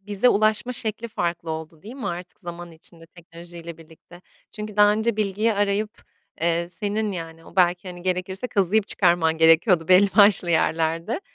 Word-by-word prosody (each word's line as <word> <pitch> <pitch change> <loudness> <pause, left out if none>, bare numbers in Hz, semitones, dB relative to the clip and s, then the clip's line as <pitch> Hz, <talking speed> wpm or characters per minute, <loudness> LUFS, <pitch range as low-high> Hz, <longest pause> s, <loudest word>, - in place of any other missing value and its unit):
bize 205 +4 +1
ulaşma 215 +4 +1
şekli 225 0 -3
farklı 170 -5 -3
oldu, 160 0 -7
değil 225 +5 -10
mi 255 -7 -6
artık 180 +2 -8
zaman 175 -1 -9
içinde 165 +1 -14
teknolojiyle 170 -1 -12
birlikte? 165 +2 -17 0.3
Çünkü 210 -1 -8
daha 210 0 +6
önce 220 +1 -1
bilgiyi 215 +2 0
arayıp, 205 +2 -2 0.4
eee, 170 +1 0
senin, 210 +2 -3
yani, 165 -2 -8
o - - -17
belki, 180 +1 +2
hani, 175 -1 -9
gerekirse 185 +5 -3
kazıyıp 205 -1 +1
çıkarman 170 -3 +1
gerekiyordu 165 +1 +4
belli 185 +2 +6
başlı 200 -4 +5
yerlerde. 165 - 0
180 Hz, 160 wpm, -23 LUFS, 170-210 Hz, 0.4 s, daha